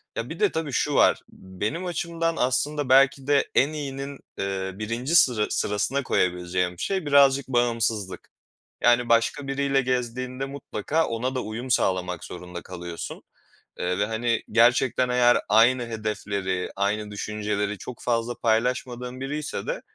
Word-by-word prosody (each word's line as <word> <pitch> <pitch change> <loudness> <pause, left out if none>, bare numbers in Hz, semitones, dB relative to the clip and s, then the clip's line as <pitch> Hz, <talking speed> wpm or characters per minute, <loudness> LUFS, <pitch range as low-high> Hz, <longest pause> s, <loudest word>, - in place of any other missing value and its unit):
Ya, - - -4
bir - - -7
de 420 - +3
tabii 155 -4 -3
şu 145 +3 0
var. - - +5
Benim 105 - -5
açımdan 165 -1 -2
aslında 140 +2 0
belki 135 +1 +4
de 145 -1 +3
en 140 - +4
iyinin, 140 -1 -5 0.2
eee, 95 -1 -2
1'nci 115 +9 -2
sıra 120 -10 +5
sırasına 110 +7 0
koyabileceğim 90 -2 0
şey 190 -5 -1
birazcık 140 -1 +5
bağımsızlık. 115 -6 -1 0.5
Yani, 120 0 +4
başka 115 +4 +2
biriyle 135 0 +1
gezdiğinde 125 +1 -2
mutlaka 140 +2 -2
ona 125 +3 -2
da 130 - -1
uyum 120 +4 -6
sağlamak 90 -4 0
zorunda 90 -1 -8
kalıyorsun, 85 -2 -7 0.6
eee, 90 +2 -1
ve, 105 - +2
hani, 115 +1 -1
gerçekten 120 +2 +3
eğer 125 0 +4
aynı 120 +4 +5
hedefleri, 100 -4 -3
aynı 105 +1 -1
düşünceleri 105 0 -2
çok 120 +6 -9
fazla 120 0 -1
paylaşmadığın 125 +2 -1
biriyse 150 - -4
de - - -3
120 Hz, 140 wpm, -25 LUFS, 105-135 Hz, 0.6 s, var